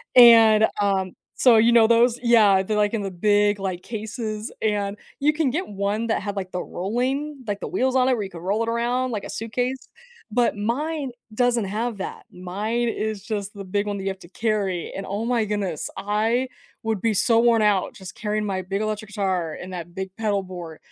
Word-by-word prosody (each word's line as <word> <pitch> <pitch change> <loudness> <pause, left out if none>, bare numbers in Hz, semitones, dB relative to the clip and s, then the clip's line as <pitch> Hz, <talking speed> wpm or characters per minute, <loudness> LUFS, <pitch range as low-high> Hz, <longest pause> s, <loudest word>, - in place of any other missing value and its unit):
and, 225 -3 +8
um 190 -2 0 0.2
so 245 -3 +6
you 230 +2 +5
know 230 -1 +7
those? 235 +1 +4
Yeah, 215 -5 +5
they're, 210 +2 -1
like, 210 0 +2
in 225 - 0
the 195 - -3
big, 205 +2 +2
like, 185 -2 -3
cases 220 -1 -5
and 205 -1 -1 0.2
you 295 +2 +3
can 305 -3 +1
get 345 +8 -2
one 205 +3 -2
that 225 - 0
had, 205 +1 -4
like, 185 -1 -4
the 180 - -3
rolling 260 +8 -2
like 205 -1 -2
the - - -3
wheels 260 0 0
on 255 -1 +4
it - - +4
where 225 -4 -1
you 195 - -6
could 170 - -9
roll 200 +5 0
it 230 - -2
around 245 +2 0
like 210 -3 -3
a - - -7
suitcase? 245 +3 -3 0.4
But 240 0 +2
mine 275 +6 -2 0.2
doesn't 245 -2 +2
have 220 +3 -2
that, 195 - -6
mine 205 +7 -2
is 215 -2 -3
just 210 -3 -4
the 200 - -8
big 200 +2 -1
one 205 -1 -2
that 195 - -5
you 195 - -1
have 190 -1 -5
to 170 - -14
carry, 200 -4 -1
and 195 - -5
oh 205 +3 -3
my 235 -2 +1
goodness, 205 -6 -2
I 220 +5 0 0.4
would 220 -2 -1
be 225 -1 +2
so 225 +3 +3
worn 230 -1 +4
out 205 -3 +2
just 190 -1 -10
carrying 210 0 -2
my 190 -2 -2
big 195 +3 -3
electric 215 -1 -3
guitar 185 -5 -1
and 185 +1 -8
that 175 -1 -7
big 190 0 -4
pedalboard 185 -6 -3
215 Hz, 210 wpm, -23 LUFS, 195-235 Hz, 0.4 s, and